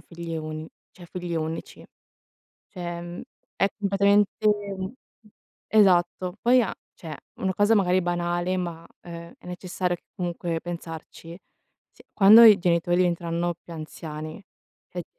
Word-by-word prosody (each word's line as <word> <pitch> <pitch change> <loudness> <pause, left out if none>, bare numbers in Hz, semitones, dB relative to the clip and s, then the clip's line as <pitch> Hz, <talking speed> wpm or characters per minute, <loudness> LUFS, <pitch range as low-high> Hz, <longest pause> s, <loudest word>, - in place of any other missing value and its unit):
figlie 170 -1 -7
uni 155 0 -6 0.2
cioè 175 -2 -14
figlio 175 -2 -4
unici. 160 +1 -6 0.9
Cioè, 175 -3 -5
mhmm, 175 0 -7 0.3
è 195 - +3
completamente 200 +1 +2
mhmm, 200 -2 -1 0.8
esatto. 185 -2 +3
Poi 250 +1 +5
a 210 - -2 0.2
cioè 160 -3 -8 0.2
una 190 -1 0
cosa 205 +4 +3
magari 185 -2 +3
banale, 175 +1 -1
ma 170 -2 -4
è 170 -1 -9
è - - -20
necessario 180 0 -3 0.2
comunque 170 -2 -3
pensarci, 165 0 -8 0.5
sì: - - -20
quando 215 +3 +9
i 215 -3 +9
genitori 175 0 +2
diventeranno 175 -1 0
più 170 - -11
anziani, 155 +2 -7 0.5
e 175 -1 -5
175 Hz, 125 wpm, -25 LUFS, 170-190 Hz, 0.9 s, quando